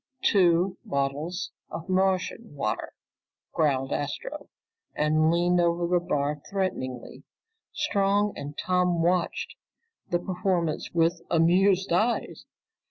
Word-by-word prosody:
"Two 180 -1 +3
bottles 140 +6 -2 0.2
of 165 - -7
Martian 190 +1 0
water!" 110 -6 -3 0.6
growled 135 -4 +1
Astro 145 -1 -4 0.5
and 155 +1 +3
leaned 175 +1 +3
over 170 0 +1
the 175 +1 +2
bar 145 -2 -1
threateningly. 130 -11 -3 0.5
Strong 205 - +1
and 145 +1 -7
Tom 180 -2 +1
watched 175 0 0 0.6
the 175 - +2
performance 175 -3 -1
with 170 0 +1
amused 185 +3 +3
eyes. 220 +7 0
175 Hz, 100 wpm, -27 LUFS, 155-185 Hz, 0.6 s, Two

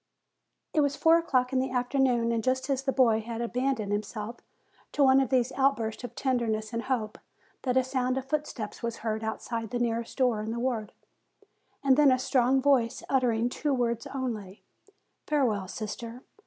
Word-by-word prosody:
It 310 - +3
was 285 -1 +1
four 330 +1 +5
o'clock 260 -6 0
in 260 - +3
the 260 - 0
afternoon, 250 -2 +1
and 230 -1 -1
just 260 +3 0
as 270 -1 0
the 270 0 0
boy 230 -5 +3
had 230 +1 -6
abandoned 240 -2 -1
himself 210 +2 -3 0.6
to 290 - +3
one 265 0 +6
of 270 - +1
these 255 -1 +2
out 275 0 +2
bursts 225 +1 -4
of 240 -1 -7
tenderness 235 -4 -1
and 230 - -1
hope, 225 -5 -2 0.4
that 255 -1 0
a 260 - +4
sound 255 0 -1
of 265 - -3
foot 300 +2 -1
steps 215 -4 -7
was 235 -1 -3
heard 220 0 -1
outside 225 0 -4
the 245 - -2
nearest 230 -1 -2
door 245 -5 +2
in 215 - -4
the 230 +1 -3
ward, 235 -4 -2 0.9
and 270 -1 +4
then 295 -3 +6
a 255 - +4
strong 255 +1 +2
voice 260 -5 +2
uttering 240 -3 +2
two 280 +3 -1
words 235 -2 -1
only, 225 -7 -5 0.6
"Farewell, 230 -10 +1
sister!" 230 +4 -6
245 Hz, 185 wpm, -28 LUFS, 225-265 Hz, 0.9 s, one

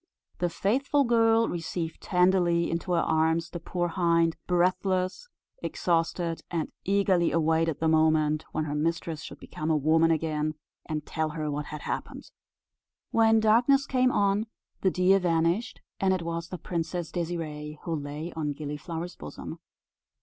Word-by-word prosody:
The 175 - +1
faithful 265 - +1
girl 230 -2 +4
received 165 -1 -4
tenderly 180 -2 +2
into 170 +2 -2
her 170 - +3
arms 160 +1 +1
the 175 - -5
poor 175 +1 -2
hind, 170 -1 +2
breathless, 185 - +1 0.3
exhausted; 170 0 -1
and 165 -3 -2
eagerly 195 -3 +2
awaited 160 -1 +1
the 160 - +1
moment 155 -1 +3
when 155 - -1
her 145 - -3
mistress 160 +1 -1
should - - -9
become 155 +1 -5
a 155 - +3
woman 160 +3 +3
again, 155 -1 0 0.3
and 155 -2 -3
tell 160 -1 -2
her 155 -1 -3
what 145 +1 -3
had 150 - -7
happened. - - -5 0.8
When 225 -1 +5
darkness 245 +6 +4
came 255 -1 +2
on, 205 +1 +1 0.3
the 190 - +3
deer 185 +2 +4
vanished, 170 +5 0 0.2
and 190 -1 +3
it 180 - -4
was 170 0 -4
the 180 - -5
Princess 170 0 -3
Désirée 155 -3 -4
who 170 - -3
lay 150 +3 -5
on 150 -2 -2
Gilliflower's 155 +4 -5
bosom. 75 - -8
170 Hz, 150 wpm, -28 LUFS, 160-185 Hz, 0.8 s, When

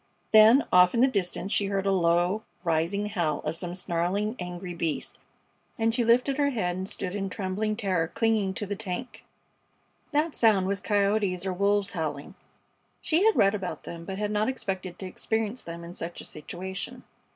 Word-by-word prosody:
Then 220 +5 +7
off 180 +2 +6
in 235 - +3
the 260 - +7
distance 195 -4 -2
she 205 - +2
heard 195 0 -1
a 195 - +3
low, 175 +2 +2 0.2
rising 170 +4 0
howl 170 -8 -1
of 155 +1 -2
some 175 +1 -5
snarling, 185 +5 -1
angry 180 0 -5
beast, 165 -2 -3 0.6
and 225 0 +1
she 240 0 +1
lifted 250 +5 +3
her 285 -1 +3
head 180 -9 -1
and 190 +2 -4
stood 185 -2 -4
in 195 -1 -2
trembling 205 +3 -2
terror, 185 -7 0
clinging 210 -1 +1
to 205 - -3
the 205 +1 -3
tank. 225 +4 -6 0.9
That 300 +1 +1
sound 210 -5 +4
was 195 +1 -1
coyotes 200 -3 +1
or 190 - -1
wolves 200 +1 +1
howling. 150 -5 -4 0.7
She 330 +4 +2
had 445 - +5
read 195 0 +4
about 190 -3 -4
them, 170 -1 -8
but 190 +2 -5
had 210 0 -1
not 210 +3 +1
expected 190 -8 -4
to 190 - -6
experience 220 +5 -2
them 170 0 -8
in 170 +1 -8
such 170 0 -6
a - - -7
situation. 190 +10 -6
195 Hz, 185 wpm, -27 LUFS, 180-220 Hz, 0.9 s, Then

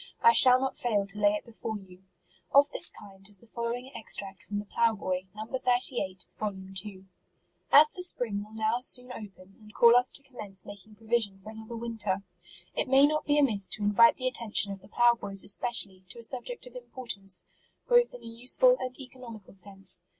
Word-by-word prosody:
I 230 - +7
shall 250 +2 +9
not 265 0 -3
fail 210 -5 -1
to 200 +1 -9
lay 205 0 +3
it 210 - -6
before 225 -2 -6
you. 185 -2 -16 0.5
Of 285 +1 +5
this - - +4
kind 195 0 -14
is 200 -2 -8
the - - -19
following 235 +3 -5
extract 195 -3 0
from 205 - -6
the 205 - -5
Plough 230 +2 +1
Boy, 185 -2 -4
No. 215 +1 -6
38, 245 -6 -1
vol. 210 -2 -4 0.2
2. 195 0 -7 0.3
" - - -44
As 300 +1 +7
the 365 - -8
spring 230 - -1
will 215 +1 -16
now 220 +2 0
soon 250 0 +2
open, 195 -4 -12
and 215 0 -17
call 235 0 +6
us 245 +1 +3
to 280 - 0
commence 215 -8 -10
making 205 +1 -12
provision 220 -2 -1
for 195 +3 -11
another 220 +1 -10
winter, 220 -4 -3 0.5
it - - -1
may 270 +2 +6
not 305 +1 -1
be 290 0 +2
amiss 220 -9 +1
to 210 - -4
invite 210 +3 +5
the 255 - -3
attention 225 -5 +1
of 195 -1 -8
the 195 - -17
plough 240 +3 +3
boys 200 -4 0
especially, 200 -3 -1
to - - -10
a 235 - -10
subject 255 - -2
of - - -14
importance, 220 - -4 0.4
both 485 0 +4
in - - -13
a - - -13
useful 250 - +2
and 255 +1 -6
economical 245 -7 -12
sense. 195 -2 -4
220 Hz, 200 wpm, -28 LUFS, 200-250 Hz, 0.5 s, shall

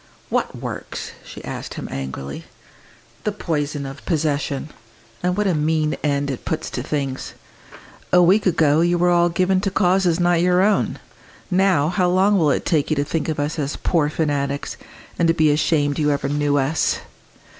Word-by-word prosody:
"What - - -1
works?" - - -6
she - - -11
asked - - -6
him - - -5
angrily. 70 +1 -6 0.8
"The 210 - 0
poison 150 -7 -2
of 135 +1 -8
possession. 150 -3 -1 0.5
And 180 +1 0
what 210 - +1
a 190 - +2
mean 155 0 +1
end 140 -1 0
it 130 - -6
puts 160 0 -3
to - - -3
things! 135 -3 -3 0.8
A 180 - +6
week 190 +4 +4
ago 160 -3 +3
you 175 +1 +2
were 175 +1 +3
all 175 0 +4
given 185 +2 +1
to 200 - 0
causes 185 -2 +2
not 175 -1 +3
your 180 +1 +3
own; 210 0 +1 0.5
now, 180 -5 +3
how 180 0 +1
long 195 +2 +3
will 155 -3 +3
it - - 0
take 155 -5 +1
you 155 - +2
to 145 0 0
think 160 +2 -2
of 155 - -2
us 150 +3 -2
as 145 0 -2
'poor 155 -4 +1
fanatics!' 145 -2 -2 0.4
and 170 - +3
to 165 - +3
be 155 -2 +4
ashamed 145 -1 +1
you 150 -1 +2
ever 145 -1 0
knew 145 0 +1
us?" 140 +3 +1
160 Hz, 180 wpm, -21 LUFS, 145-180 Hz, 0.8 s, A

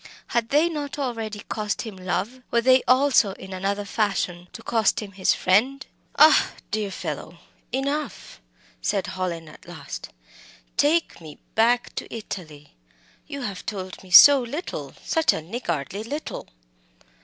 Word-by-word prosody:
Had 230 -1 0
they 300 +4 +4
not 295 -4 -4
already 225 -6 -3
cost 210 0 -3
him 220 -4 -8
love? 190 +7 -3
Were 235 - +2
they 260 +1 +5
also, 255 -5 +4
in 190 0 -10
another 200 +2 -2
fashion, 190 -4 -1
to - - -10
cost 225 -3 +2
him 210 -2 -7
his 185 -1 +1
friend? 250 +9 +2 0.3
"Ah, 310 0 +6 0.2
dear 215 0 0
old 195 - -7
fellow - - -6 0.3
enough!" 280 - -3 0.4
said 195 - 0
Hallin 175 -3 -4
at 155 - -15
last - - -8 0.7
"take 315 - +1
me 155 -2 -11 0.2
back 240 +2 +2
to - - -6
Italy! 155 -9 -8 0.5
You 280 -2 -6
have 200 -7 -5
told 190 -4 -6
me 190 - -15
so 280 +10 +10
little 285 +9 -6
such 325 -1 +3
a - - -3
niggardly 175 - -4
little!" 290 +8 -6
215 Hz, 145 wpm, -24 LUFS, 185-265 Hz, 0.7 s, so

